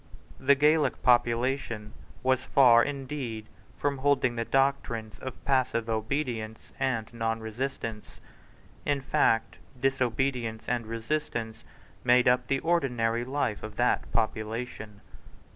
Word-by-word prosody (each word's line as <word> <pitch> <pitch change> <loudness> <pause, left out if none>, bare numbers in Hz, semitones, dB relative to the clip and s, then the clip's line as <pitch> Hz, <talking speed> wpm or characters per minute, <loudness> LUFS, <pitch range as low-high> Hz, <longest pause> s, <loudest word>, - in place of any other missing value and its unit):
The 140 +2 +5
Gaelic 150 -1 +2
population 120 -2 +1 0.3
was 130 0 +3
far 125 -3 +6
indeed 135 -6 -4 0.3
from 140 -2 -1
holding 135 -3 +2
the 115 - -1
doctrines 135 -4 0
of 130 - -8
passive 130 -4 +1
obedience 110 -1 -3
and 130 -5 0
nonresistance. 115 0 -4 0.6
In 145 -1 0
fact 115 -4 +1 0.2
disobedience 125 -3 -1
and 120 -2 -1
resistance 115 -1 -3 0.4
made 125 0 +5
up 125 0 +3
the 135 0 0
ordinary 120 -9 +1
life 130 -4 -2
of 110 -1 -8
that 120 +2 +1
population. 110 -1 -3
125 Hz, 110 wpm, -28 LUFS, 115-135 Hz, 0.6 s, far